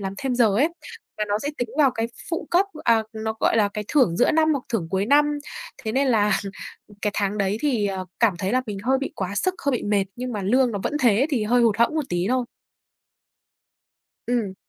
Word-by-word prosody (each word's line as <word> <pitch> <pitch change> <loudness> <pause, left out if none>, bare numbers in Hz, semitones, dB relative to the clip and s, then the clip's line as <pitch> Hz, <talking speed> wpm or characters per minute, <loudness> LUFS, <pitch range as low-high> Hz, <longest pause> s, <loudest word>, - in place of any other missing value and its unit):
làm 195 -1 -4
thêm 265 -3 -1
giờ 240 -2 +4
ấy, 290 +7 +4 0.5
mà 210 - +1
nó 205 +1 +1
sẽ 285 - -2
tính 245 -2 -2
vào 285 -3 +5
cái 225 -2 -2 0.2
phụ 330 - -3
cấp, 365 +3 +3 0.2
à, 230 -2 +4
nó, 220 0 -3
gọi - - +2
là, 205 -2 +3
cái 210 +1 -5
thưởng 250 - +3
giữa 245 - +4
năm 315 0 +3
hoặc 275 -4 -2
thưởng 200 -9 -2
cuối 195 +2 0
năm. 295 +2 +3 0.5
Thế 220 - -2
nên 270 +2 +2
là 210 -4 +3 0.7
cái 210 - +1
tháng 205 0 -1
đấy 200 +1 0
thì, 240 -9 +1
ờ, 190 -1 -4
cảm 230 -4 +4
thấy 190 +3 -2
là 255 +1 +2
mình 210 -3 -5
hơi 265 +3 +2
bị 280 - -4
quá 190 +1 -4
sức, 370 - +1
hơi 280 - +3
bị 245 - -2
mệt, 205 -2 +1
nhưng 250 0 -4
mà 210 - -3
lương 250 +5 +3
nó 205 - -3
vẫn - - -2
thế 240 +2 +4
thì 245 -8 0
hơi 245 +3 +3
hụt 225 -3 +3
hẫng 235 +7 +2
một 310 - 0
tí 175 0 0
thôi. 255 -1 +1 1.8
Ừm. 230 -6 -1
230 Hz, 235 wpm, -23 LUFS, 205-265 Hz, 1.8 s, vào